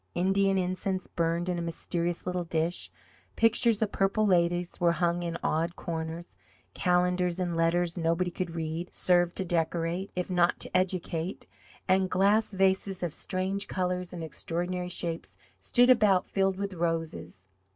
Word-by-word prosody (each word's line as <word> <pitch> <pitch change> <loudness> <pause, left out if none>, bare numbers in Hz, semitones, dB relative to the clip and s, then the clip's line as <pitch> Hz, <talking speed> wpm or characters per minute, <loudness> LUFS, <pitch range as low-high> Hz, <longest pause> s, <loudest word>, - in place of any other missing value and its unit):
Indian 195 +2 +2
incense 185 +1 -1
burned 170 +1 -1
in 180 -1 -1
a - - -2
mysterious 170 +1 -3
little 180 -1 -1
dish, 165 +1 -1 0.5
pictures 230 -1 +3
of 210 - -2
purple 195 +2 +1
ladies 175 -2 +1
were 170 -1 +3
hung 175 0 0
in 170 -1 -3
odd 165 +2 0
corners, 165 +1 -5 0.4
calendars 180 0 +1
in 175 -2 -1
letters 170 +1 +1
nobody 170 +2 +1
could 170 -1 -4
read, 165 +2 -4
served 175 -1 +3
to 190 - -2
decorate, 170 +2 -1
if 180 -1 -2
not 175 -2 +2
to - - -2
educate, 180 -1 -1 0.4
and 190 0 +3
glass 200 +4 +3
vases 190 -1 +1
of 170 -3 -2
strange 190 +1 -2
colours 180 -1 -2
and 170 -2 -6
extraordinary 175 +3 -3
shapes 170 -2 -4 0.2
stood 245 +1 +4
about 210 -6 +4
filled 195 -1 0
with 200 0 -3
roses. 165 - -3
180 Hz, 150 wpm, -29 LUFS, 170-190 Hz, 0.5 s, stood